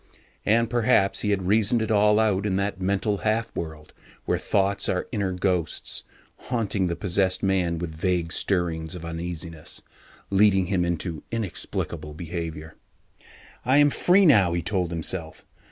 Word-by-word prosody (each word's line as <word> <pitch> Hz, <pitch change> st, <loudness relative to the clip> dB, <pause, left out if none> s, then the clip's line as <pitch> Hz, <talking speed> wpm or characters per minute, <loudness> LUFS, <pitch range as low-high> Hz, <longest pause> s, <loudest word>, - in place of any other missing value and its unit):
And 115 Hz, +2 st, +3 dB
perhaps 115 Hz, -4 st, +2 dB
he 105 Hz, -, -1 dB
had 95 Hz, -2 st, 0 dB
reasoned 110 Hz, +4 st, +3 dB
it 110 Hz, 0 st, -2 dB
all 105 Hz, 0 st, +4 dB
out 105 Hz, -2 st, +1 dB
in 95 Hz, -, 0 dB
that 100 Hz, -1 st, -2 dB
mental 100 Hz, +2 st, 0 dB
half 110 Hz, +3 st, -1 dB
world 80 Hz, -2 st, -6 dB, 0.3 s
where -, -, 0 dB
thoughts 100 Hz, 0 st, +1 dB
are 90 Hz, -, -1 dB
inner 100 Hz, -5 st, -1 dB
ghosts, 90 Hz, -3 st, -1 dB, 0.4 s
haunting 110 Hz, -6 st, 0 dB
the 85 Hz, -, -2 dB
possessed 95 Hz, +1 st, 0 dB
man 90 Hz, -3 st, +1 dB
with 85 Hz, -1 st, -4 dB
vague 85 Hz, 0 st, 0 dB
stirrings 85 Hz, -3 st, -1 dB
of 85 Hz, -2 st, -8 dB
uneasiness, 85 Hz, -1 st, -5 dB, 0.5 s
leading 95 Hz, -1 st, +4 dB
him 90 Hz, -1 st, 0 dB
into 85 Hz, -2 st, -2 dB
inexplicable 95 Hz, -7 st, -4 dB
behaviour. 80 Hz, -2 st, -6 dB, 0.9 s
I 130 Hz, +3 st, +3 dB
am 145 Hz, 0 st, +5 dB
free 190 Hz, +6 st, +4 dB
now, 100 Hz, -, +5 dB
he 85 Hz, -1 st, -1 dB
told 90 Hz, -4 st, -1 dB
himself. 85 Hz, 0 st, -3 dB
95 Hz, 150 wpm, -25 LUFS, 85-105 Hz, 0.9 s, am